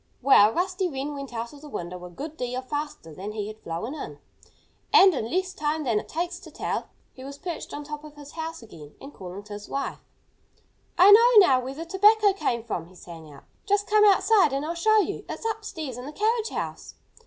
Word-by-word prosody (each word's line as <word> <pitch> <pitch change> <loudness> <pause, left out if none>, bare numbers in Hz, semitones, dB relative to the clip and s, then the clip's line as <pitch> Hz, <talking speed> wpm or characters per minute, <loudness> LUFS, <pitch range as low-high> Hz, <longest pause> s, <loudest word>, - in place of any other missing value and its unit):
Well, 215 -6 +6
Rusty 370 - -1
Wren 280 0 -4
went 275 -2 -7
out 230 +1 -5
of 285 - -13
the 300 - -11
window 180 -5 -6
a - - -9
good 295 - -8
deal 250 -1 -4
faster 290 - -5
than 200 +6 -7
he 210 -2 -3
had 215 +1 -9
flown 170 - -5
in. 310 - -7 0.7
And, 390 -3 +7
in 230 -6 -3
less 370 +3 -1
time 305 +1 -2
than 230 -6 +1
it - - -11
takes 350 +2 -3
to - - -13
tell - - -2
it, - - -16 0.3
he 260 - -12
was 280 +1 -8
perched 345 +1 -6
on 295 - -6
top 300 0 -7
of 300 -1 -12
his 290 -1 -12
house 325 -4 -6
again 150 -9 -13
and 280 +1 -11
calling 185 +2 -9
to 205 0 -10
his 205 0 -9
wife. 275 - -3 1.0
"I 380 +3 +8
know 445 -1 +8
now 260 -5 +4
where 260 +2 -6
the 330 +3 -6
tobacco 410 +3 +4
came 235 - -2
from!" 175 -8 -4
he 185 - -19
sang 165 -3 -12
out. 140 - -15 0.2
"Just 405 0 +2
come 420 0 +4
outside 405 -5 +5
and 275 +2 -1
I'll 330 - -2
show 435 +6 +3
you. - - -4
It's - - -6
upstairs 325 - -4
in 250 - -8
the 300 - -8
carriage 445 +4 0
house!" - - -6
290 Hz, 225 wpm, -26 LUFS, 225-370 Hz, 1.0 s, I